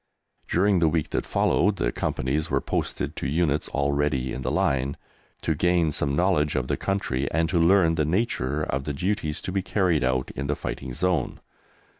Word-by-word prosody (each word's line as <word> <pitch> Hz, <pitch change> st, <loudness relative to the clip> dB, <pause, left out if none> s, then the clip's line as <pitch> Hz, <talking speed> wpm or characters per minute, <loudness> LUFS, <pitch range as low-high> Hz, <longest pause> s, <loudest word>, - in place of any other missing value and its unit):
During 95 Hz, +1 st, +3 dB
the 85 Hz, -, +4 dB
week 80 Hz, -1 st, -1 dB
that -, -, -2 dB
followed -, -, +2 dB
the -, -, 0 dB
Companies 70 Hz, +5 st, -1 dB
were -, -, +2 dB
posted -, -, -3 dB
to -, -, -2 dB
units 75 Hz, 0 st, 0 dB
already 70 Hz, -2 st, 0 dB
in 65 Hz, -, -5 dB
the 65 Hz, -, -1 dB
line, 70 Hz, +1 st, 0 dB, 0.5 s
to 80 Hz, -, +1 dB
gain 85 Hz, 0 st, +2 dB
some 70 Hz, -1 st, -1 dB
knowledge 80 Hz, -4 st, +2 dB
of 65 Hz, -2 st, 0 dB
the -, -, 0 dB
country, 70 Hz, -9 st, -1 dB
and 80 Hz, +1 st, +1 dB
to 85 Hz, -, +1 dB
learn 85 Hz, 0 st, +5 dB
the 80 Hz, -2 st, +1 dB
nature 75 Hz, -, 0 dB
of 65 Hz, -1 st, -2 dB
the 75 Hz, -, -2 dB
duties 80 Hz, -1 st, -2 dB
to -, -, -3 dB
be 95 Hz, +1 st, 0 dB
carried 90 Hz, -6 st, +1 dB
out 65 Hz, 0 st, 0 dB
in 70 Hz, 0 st, -4 dB
the 75 Hz, -, 0 dB
fighting 65 Hz, -2 st, -5 dB
zone. 90 Hz, +2 st, 0 dB
75 Hz, 190 wpm, -25 LUFS, 70-90 Hz, 0.5 s, learn